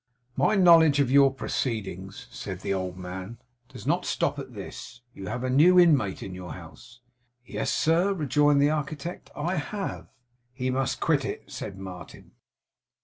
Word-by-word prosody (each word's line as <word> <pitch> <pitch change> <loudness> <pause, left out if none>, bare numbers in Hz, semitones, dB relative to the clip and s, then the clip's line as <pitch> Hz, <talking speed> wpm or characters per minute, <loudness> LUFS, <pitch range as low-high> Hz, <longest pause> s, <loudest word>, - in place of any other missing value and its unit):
'My 215 - +2
knowledge 165 -6 +6
of 135 -3 +2
your 140 0 +6
proceedings,' 110 -4 -4
said 95 -2 -7
the 100 - -1
old 95 -1 -3
man, 95 +4 -7 0.3
does - - -11
not - - +1
stop - - -1
at - - -9
this. 125 - -9
You 95 -4 -8
have 120 +3 -4
a 130 - -1
new 175 +7 +6
inmate 140 - +3
in 95 - -7
your 90 -1 -7
house.' 115 +9 -13 0.4
'Yes, - - -2
sir,' 170 +5 +2
rejoined 150 -4 +2
the 145 - +4
architect, 155 +3 -4
'I 175 +5 -2
have.' 195 +6 -4 0.5
'He 130 +1 -2
must 130 0 -1
quit - - +2
it' - - -6
said 95 - -6
Martin. 90 -4 -10
130 Hz, 160 wpm, -26 LUFS, 95-155 Hz, 0.5 s, knowledge